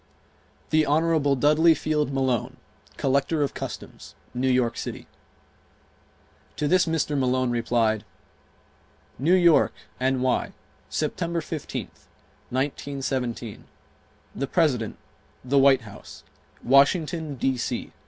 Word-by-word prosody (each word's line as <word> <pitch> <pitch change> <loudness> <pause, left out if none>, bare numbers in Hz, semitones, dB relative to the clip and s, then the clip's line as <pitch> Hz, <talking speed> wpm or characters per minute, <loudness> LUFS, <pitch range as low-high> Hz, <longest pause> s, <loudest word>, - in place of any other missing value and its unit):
Hon. 155 -2 +2
Dudley 155 +4 +5
Field 150 -1 -1
Malone, 130 -3 -1 0.4
Collector 140 +3 +1
of 140 - -2
Customs, - - -8 0.2
New 130 +1 0
York 125 -2 +2
City. - - -6 1.5
To 150 - -1
this 180 +2 +3
Mr. 160 -2 0
Malone 130 -2 +1
replied: 115 -3 +1 1.2
New 165 +8 +4
York, 175 -3 +4 0.3
N.Y., 130 0 0 0.4
September 170 +2 -2
15th, 160 -2 -7 0.4
1917. 130 -4 -3 0.7
The 140 - -2
President, 135 - +1 0.5
The 140 +2 +3
White 135 -1 +5
House, 105 -3 -12 0.4
Washington, 150 +3 +3
D. 135 +1 0
C. 120 - -3
140 Hz, 95 wpm, -25 LUFS, 125-155 Hz, 1.5 s, Dudley